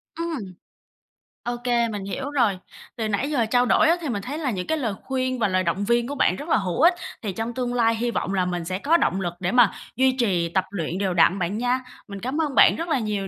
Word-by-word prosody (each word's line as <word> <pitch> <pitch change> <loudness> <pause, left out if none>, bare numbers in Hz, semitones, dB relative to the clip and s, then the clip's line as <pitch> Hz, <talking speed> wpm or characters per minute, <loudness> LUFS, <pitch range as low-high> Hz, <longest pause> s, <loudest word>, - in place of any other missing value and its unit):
Ừm. 310 - -4 0.9
Ô 240 0 -2
kê, 240 -1 +2
mình 205 -3 -5
hiểu 265 +8 -4
rồi. 235 -9 +2 0.4
Từ 225 -3 -2
nãy 215 +7 -1
giờ 245 -6 +2
trao 245 +2 +2
đổi 315 - +4
á, 335 - +5
thì 305 - -3
mình 205 -4 -2
thấy 280 +8 -5
là 285 -6 -1
những 185 -4 -4
cái 315 - 0
lời 235 -8 -2
khuyên 255 -1 -2
và 220 - +2
lời 185 0 +1
động 185 +4 -1
viên 235 +1 +2
của 285 - -4
bạn 185 - +2
rất 295 - -8
là - - +4
hữu 190 +3 -2
ích, 340 +3 +7 0.3
thì 205 -4 -3
trong 225 +4 -4
tương 245 0 -2
lai 230 -2 +2
hy 240 +1 -1
vọng 195 - -2
là 185 -2 +1
mình 175 -2 -3
sẽ 185 +2 -3
có 315 +9 +3
động 190 - 0
lực 175 -1 -2
để 185 -1 -1
mà 245 -3 +5 0.2
duy 260 0 +3
trì 180 -8 +1
tập 185 +2 0
luyện 175 -2 -3
đều 195 -2 0
đặn 175 +3 +4
bạn 185 +4 -1
nha. 245 +2 +1 0.3
Mình 200 -1 -7
cám 260 +9 -2
ơn 295 -4 -2
bạn - - +7
rất 335 +1 -4
là 275 -5 +2
nhiều 210 -3 -2
230 Hz, 265 wpm, -24 LUFS, 195-260 Hz, 0.9 s, ích